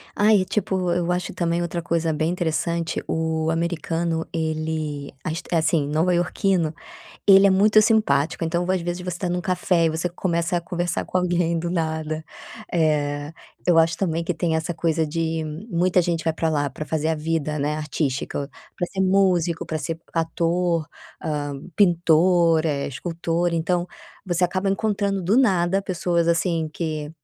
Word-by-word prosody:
Ai, 210 -1 +5
e - - -2
tipo, 190 -4 -1
eu 175 0 0
acho 180 0 -2
também 170 -1 0
outra 170 0 -2
coisa 165 -1 0
bem 155 +2 0
interessante. 170 -1 -1
O 160 0 -1
americano, 165 0 -1
ele 155 -3 -3
ach 160 +3 -3
eh, - - +2
assim, 155 -2 +1
nova 160 +4 +1
iorquino, 175 -2 +1 0.5
ele 195 0 +8
é - - +5
muito 210 +3 +5
simpático, 170 -9 +2
então, 170 +2 0
às 185 -1 +1
vezes, 175 +1 -4
você 180 -1 -4
tá 180 - -2
num 180 0 -1
café 180 -2 +1
e - - +2
você 160 +3 -1
começa 170 -1 -1
a - - +1
conversar 175 0 -2
com 185 - -1
alguém 175 -2 +1
do 170 +1 -3
nada. 160 -2 -2 0.5
Eh, 150 -2 0 0.3
eu 175 -2 +5
acho 165 0 +3
também 170 -3 -1
que 175 +2 -1
tem 160 +1 0
essa 160 +2 -1
coisa 165 -1 0
de, 160 +1 -2 0.2
muita 180 0 +2
gente 165 -2 -1
vai 160 - +2
pra 165 0 -1
lá 145 -3 0
pra 155 - -6
fazer 160 +1 -1
a 160 - +2
vida, 155 -1 -2
né, 145 +2 0
artística, 145 -2 -2 0.3
pra 175 - -1
ser 190 - -2
músico, 185 -3 +2
pra 155 - -2
ser 160 +3 -4
ator, 165 0 0 0.4
hã, 145 -3 -3 0.2
pintor, 170 -2 +4
eh, 145 -3 -1
escultor. 170 +4 -2
Então, 175 +2 0 0.4
você 180 -1 +1
acaba 185 +2 -1
encontrando 200 -1 0
do 195 +7 +2
nada, 195 -6 +3
pessoas 170 -2 0
assim, 165 -1 +1
que 155 -3 -3
170 Hz, 170 wpm, -23 LUFS, 160-180 Hz, 0.5 s, ele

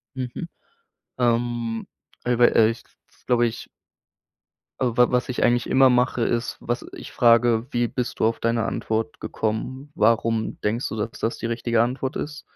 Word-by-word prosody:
Mhm. 130 +6 -5 0.7
Ähm, 120 -1 0 0.4
ey, 125 -1 +1
weil 120 - +5
ehrlich, 115 +1 +3 0.2
das - - -30
glaube 120 -1 +3
ich 115 - -5 1.1
Also 125 -3 0
wa 125 0 +5
was 125 0 +1
ich 125 - -2
eigentlich 120 0 +2
immer 135 0 +5
mache, 125 -1 +2
ist, 115 +1 -1
was 120 +1 -3
ich - - -9
frage: 115 -1 +4
„Wie 120 0 +1
bist 125 0 -4
du - - +3
auf 115 +1 0
deine 115 0 +1
Antwort 110 +5 -2
gekommen? 130 +6 -4
Warum 115 -1 +1
denkst 115 +5 -1
du, - - -5
dass 110 +1 -2
das 115 - -2
die 115 - -3
richtige 115 0 +1
Antwort 130 +3 -2
ist?“ 150 0 -5
120 Hz, 165 wpm, -23 LUFS, 115-125 Hz, 1.1 s, weil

